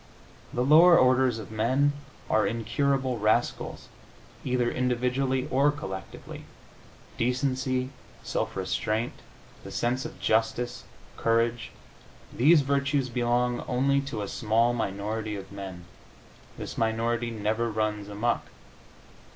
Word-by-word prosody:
The 125 - 0
lower 165 +6 +7
orders 130 -2 +4
of 110 -1 -8
men 130 +7 +2 0.3
are 110 -2 +2
incurable 125 +3 0
rascals, 105 +1 0 0.6
either 125 -2 +1
individually 125 +1 0
or 140 +3 +4
collectively. 95 -11 -8 0.7
Decency, 130 +1 0 0.3
self - - -2
restraint, 110 +3 -1 0.5
the - - -8
sense 125 +2 -1
of - - -8
justice, 115 +2 0 0.3
courage 115 0 +1 0.6
these 150 +5 +5
virtues 140 -1 0
belong 120 0 0
only 135 +2 +2
to 135 -7 -4
a - - -4
small 115 +4 +1
minority 105 0 -3
of 95 -1 -8
men. 95 -3 -8 0.7
This - - -6
minority 115 +1 0
never 110 +1 -1
runs 105 -1 -2
amuck. 110 +4 -1
120 Hz, 110 wpm, -27 LUFS, 110-130 Hz, 0.7 s, lower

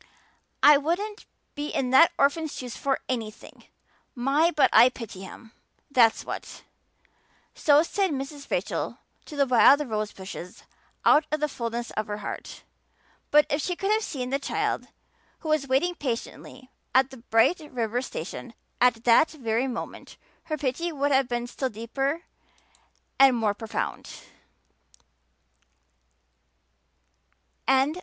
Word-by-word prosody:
I 295 0 +9
wouldn't 385 +9 -3 0.3
be 290 +1 -4
in 255 -4 -2
that 325 +6 +7
orphan's 295 +2 +1
shoes 250 -2 -6
for 275 -1 -1
anything. 225 -4 -6 0.5
My, 275 +6 +2
but 295 -5 +3
I 235 +3 +8
pity 230 -7 -9
him, 220 +4 -11 0.4
that's 235 -4 +4
what." - - -7 0.9
So 295 0 +4
said 390 +3 0
Mrs. 280 0 -6
Rachel - - -2 0.3
to 305 - -10
the 280 -1 +3
wild 270 +3 +5
rose 215 -2 -2
bushes 190 -1 -9 0.4
out 300 +1 +5
of 305 - 0
the 300 - +1
fulness 235 -3 -4
of 215 - -3
her 205 0 -4
heart; 210 - -7 0.7
but 300 0 +5
if 285 - -1
she 360 - -2
could 390 +3 -1
have 435 +1 +2
seen 260 - -4
the 275 - +1
child 275 - -2 0.5
who 315 - -5
was 305 -3 +1
waiting 275 +7 +1
patiently 255 -2 -6 0.2
at 260 0 +4
the 265 - -10
Bright 230 +8 +2
River 240 -1 -1
station 235 +1 -7 0.3
at 240 -2 +3
that 245 +7 +5
very 245 -3 -1
moment 240 -3 -7 0.3
her 310 -2 -3
pity 295 +5 -2
would 285 -1 -1
have 270 -1 +3
been 240 -1 -2
still 260 +2 -3
deeper 270 +8 -3 1.0
and 270 -2 +6
more 215 -3 +1
profound. 220 +1 -4
265 Hz, 135 wpm, -26 LUFS, 235-300 Hz, 1.0 s, I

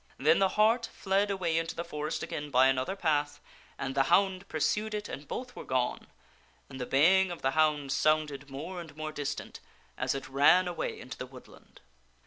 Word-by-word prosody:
Then 155 +5 +4
the 195 -1 +4
hart 225 +2 +3
fled 195 +1 0
away 175 -5 0
into 165 0 -4
the 170 - -3
forest 150 -2 -4
again 150 0 -5
by 130 -1 +5
another 130 +7 +1
path, 145 -5 0 0.4
and 135 0 -3
the 135 - +3
hound 190 -1 +2
pursued 210 +7 -1
it 210 0 -4
and 145 +1 -8
both 250 0 -6
were - - -7
gone, 125 -1 -1 0.6
and 130 -1 -7
the 125 - -3
bay 170 +8 +5
ing 190 - 0
of 175 - -7
the 135 - +2
hound 150 -2 +2
sounded 145 -1 +1
more 165 +7 -6
and 155 -3 -12
more 155 0 -4
distant 145 -1 -5 0.4
as - - 0
it 135 - -5
ran 145 +7 +5
away 175 - -3
into 130 - -9
the 125 - -5
woodland. 130 0 -16
155 Hz, 195 wpm, -30 LUFS, 140-185 Hz, 0.6 s, by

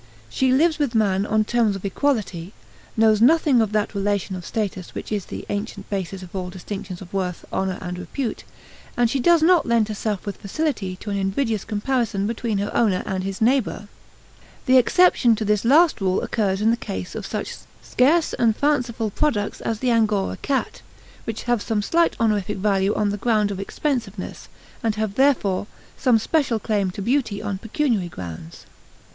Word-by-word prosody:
She 260 -1 +2
lives 310 +5 +3
with 275 -5 0
man 200 -2 +2
on 215 0 +2
terms 225 -3 +1
of 195 - -7
equality, 200 - -1 0.4
knows 220 -1 +4
nothing 280 -1 +5
of 215 -2 0
that 210 0 0
relation 200 -2 -1
of 180 -2 -7
status 200 -5 -4
which - - -6
is 205 -3 -2
the - - -7
ancient 205 -1 -5
basis 195 -1 -3
of 180 +1 -11
all 180 -1 -3
distinctions 190 0 -7
of 175 - -15
worth, 185 -3 -3
honor, 190 -1 -1
and 180 -1 -5
repute, 220 +7 -4 0.5
and 240 -1 +3
she 275 - 0
does 335 +4 +4
not 345 -3 +4
lend 230 -2 +2
herself 210 -1 -3
with 200 - -4
facility 205 -5 -2
to 205 +3 -7
an 200 - -1
invidious 205 +2 -1
comparison 215 -2 -1
between 225 -1 -2
her 200 +1 -3
owner 205 -6 +2
and 190 -1 -2
his 195 +1 -5
neighbors. 240 -2 +1 0.8
The 260 -1 +6
exception 255 -4 +4
to 215 - -3
this 210 -1 +1
last 300 +2 +4
rule 185 -1 +1
occurs 195 -3 0
in 220 +1 +4
the 235 - +1
case 95 - -6
of - - -5
such - - -4 0.3
scarce 305 +6 +2
and 225 -2 +2
fanciful 245 -6 0
products 205 -5 -1
as 225 - -2
the 250 +3 0
Angora 215 -4 +1
cat, 275 -2 -2 0.4
which 225 -1 -4
have 240 -3 +1
some 210 -2 -1
slight 335 +8 +2
honorific 210 -3 0
value 195 0 +1
on 210 -1 +1
the 205 - -2
ground 215 -4 +2
of 195 - -5
expensiveness, 220 -3 -3 0.3
and 225 -2 0
have, 215 -2 -2
therefore, 215 -7 +2 0.3
some 245 -3 +3
special 260 +1 +1
claim 205 -3 0
to 190 +2 -6
beauty 235 -4 0
on 200 -2 -4
pecuniary 225 - -1
grounds. 85 - -9
215 Hz, 180 wpm, -22 LUFS, 195-240 Hz, 0.8 s, The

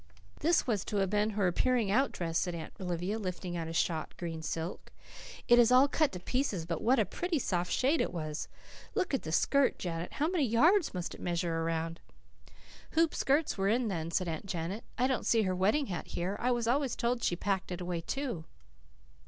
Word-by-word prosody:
"This 335 +1 +3
was 215 -7 0
to 210 - -2
have 195 -1 +1
been 210 +1 +2
her 200 - +2
appearing 225 +3 +2
out 265 +5 +3
dress," 165 -1 -1
said 175 -2 -2
Aunt 160 -2 -7
Olivia, 180 +4 -2
lifting 180 -3 -4
out 165 -1 -3
a - - -5
shot 165 -1 -1
green 165 -2 -4
silk. 165 +2 -4 0.6
"It 240 0 +7
is 240 0 +6
all 255 +2 +7
cut 305 +1 +1
to 180 - -5
pieces 205 -4 -1
but 165 -1 -3
what 250 +4 +3
a 220 - +3
pretty 340 - -2
soft 180 -8 -1
shade 280 +5 +2
it - - -1
was! 155 -3 -4 0.5
Look 370 -7 0
at 270 - +1
the 160 - -5
skirt, 280 - +3
Janet. 170 -1 -4
How 300 - 0
many 345 -3 +1
yards 305 - +3
must 180 -1 -3
it - - -11
measure 170 -1 -1
around?" 165 0 -2 1.0
"Hoopskirts 310 -5 +2
were 195 +1 +2
in 235 +1 +2
then," 165 -4 -3
said 175 +2 0
Aunt 165 +4 -4
Janet. 180 +4 -3
"I 250 - +2
don't 260 -1 0
see 225 -2 +4
her 185 -2 0
wedding 210 +11 +2
hat 180 -6 -5
here. 180 +3 -2
I 250 - +1
was 240 -2 0
always 265 +1 +1
told 235 +1 0
that - - -11
she 175 - +2
packed 190 +1 -2
it 180 - -3
away, 175 -2 -3
too." 235 - -3
195 Hz, 210 wpm, -31 LUFS, 170-255 Hz, 1.0 s, It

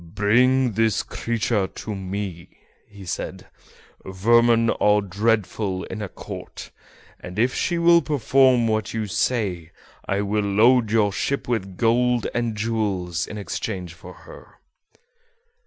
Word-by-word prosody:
"Bring 125 +5 +3
this 110 0 +1
creature 115 -3 -1
to 105 - -7
me," 95 -2 -5 0.6
said 85 - -5 0.6
he; 95 - -8
"vermin 115 +4 +3
are 105 0 +3
dreadful 100 -1 -1
in 105 - -7
a 100 - -5
court, - - -9 0.5
and 90 +2 -9
if 120 +3 +2
she 175 - -1
will 170 0 +5
perform 130 -4 +3
what 110 -1 -1
you 110 -1 -1
say 95 -5 -1 0.4
I 100 +1 0
will 105 +1 0
load 110 +4 +3
your 105 -3 +2
ship 140 +7 -2
with 95 -6 -3
gold 120 +2 +2
and 120 -3 -2
jewels 100 -6 -2
in 105 - -7
exchange 95 -3 -5
for 90 +2 -12
her." - - -14
110 Hz, 130 wpm, -23 LUFS, 100-120 Hz, 0.6 s, will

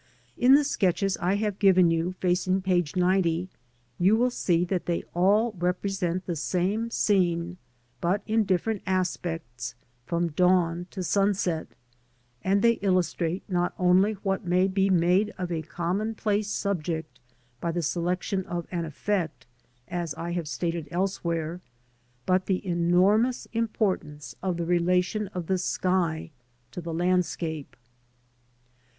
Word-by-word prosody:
In 255 +3 +6
the 295 - +5
sketches 195 -7 +1
I 180 +3 +1
have 205 -1 -2
given 185 -4 +5
you 165 +2 0
facing 185 +1 0
page 180 -4 +1
90, 180 -1 +1 0.5
you 190 +5 +5
will 250 +2 +2
see 175 -7 +1
that 180 0 -2
they 170 -1 0
all 205 +6 +3
represent 180 0 -1
the 175 - -2
same 190 +8 -1
scene, 175 -5 +1 0.4
but 190 +4 0
in 220 0 +2
different 195 +2 0
aspects, 165 -10 -2 0.3
from 170 +2 0
dawn 175 +1 +2
to 190 - -5
sunset, 195 -3 +1 0.8
and 195 +1 +2
they 235 0 +4
illustrate 185 -2 0
not 180 -2 0
only 185 +4 +4
what 195 -1 -2
may 180 +1 +2
be 195 0 +1
made 185 +3 +3
of 180 -2 -4
a 165 -2 -1
common 185 +8 -2
place 210 -1 0
subject 165 -6 -3 0.4
by 170 - -1
the 170 0 -2
selection 180 +4 -1
of 175 -1 -3
an 170 -2 -2
effect, 165 +1 -2 0.4
as 170 -2 -3
I 170 +1 -4
have 170 -3 -2
stated 165 0 -3
else 190 +4 -1
where, 165 0 -2 0.6
but 185 0 +1
the 190 0 -1
enormous 185 +7 +2
importance 185 - -2
of 185 -2 -1
the 170 - -2
relation 180 +4 +1
of 180 -2 -3
the 185 +2 0
sky 175 -3 0 0.4
to 180 - -6
the 165 0 -5
landscape. 165 -3 -1
180 Hz, 140 wpm, -27 LUFS, 170-195 Hz, 0.8 s, In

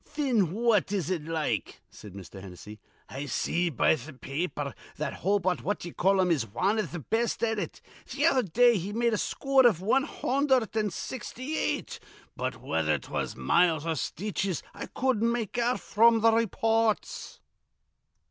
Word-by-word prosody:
"Thin 235 - 0
what 225 -2 +2
is 190 -4 -1
it 165 -5 -2
like?" 160 -1 -2
said 105 -3 -12
Mr. 95 0 -10
Hennessy. 100 +3 -11 0.3
"I 140 +2 -6
see 175 +6 0
be 155 +1 +3
th' 140 -1 -11
pa - - -11
aper 145 -2 -2 0.2
that 150 -2 -3
Hobart 190 -1 0
What 205 - -1
d'ye 175 - -8
call 195 +3 +2
him 180 -2 +3
is 135 -9 +1
wan 190 - 0
iv 215 - -2
th' 170 -6 -7
best 235 +1 0
at 225 -2 +1
it. - - -5 0.3
Th' 290 - -3
other 275 -5 +4
day 235 +4 +4
he 195 +4 -5
made 235 +1 +1
a - - +1
scoor 275 +3 +2
iv 200 -9 +2
wan 225 +8 +2
hundherd 265 -6 0
an' 215 -1 +1
sixty 255 - -5
eight, - - -2 0.4
but - - -3
whether - - +1
'twas - - -4
miles 165 -3 +2
or 165 - 0
stitches 190 +3 -3
I - - -7
cudden't 235 -3 +1
make 235 0 -2
out 240 +1 +1
fr'm 230 +1 +4
th' 225 0 +5
raypoorts." 225 0 0
205 Hz, 175 wpm, -28 LUFS, 165-235 Hz, 0.4 s, th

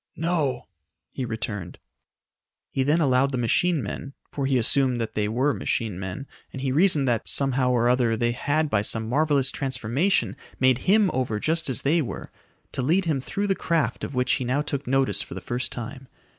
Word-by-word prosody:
"No," 150 -7 -1 0.5
he 130 - -4
returned. 110 -6 -5 0.9
He 135 - -1
then 150 +5 +3
allowed 135 -2 +3
the 130 - -2
machine 145 +6 +1
men 135 +7 -6 0.2
for 140 -2 -2
he 135 -1 +2
assumed 125 +1 +2
that 115 - -3
they 105 -1 0
were 130 +7 +1
machine 110 -8 -2
men, 95 +7 -5 0.3
and 135 - -7
he 135 -1 -1
reasoned 150 -2 +3
that, 115 -3 0
somehow 135 -2 +1
or 120 -1 +2
other 120 -2 +2
they 120 +1 +1
had 145 +6 0
by 110 -7 +1
some 110 +1 -2
marvelous 140 +1 +2
transformation 135 - 0 0.2
made 130 -1 +4
him 205 -1 +5
over 120 -5 -1
just 160 +4 0
as 130 0 -2
they 160 +4 +3
were 130 - -6 0.4
to - - -2
lead 170 +9 +2
him 150 -5 0
through 200 +9 -3
the 195 - +2
craft 160 - -1
of 140 - -5
which 125 0 +1
he - - 0
now 130 +4 0
took 140 -2 -4
notice 135 +1 +2
for - - -7
the - - -4
first 125 +1 -3
time. 130 +3 -7
130 Hz, 195 wpm, -25 LUFS, 120-145 Hz, 0.9 s, him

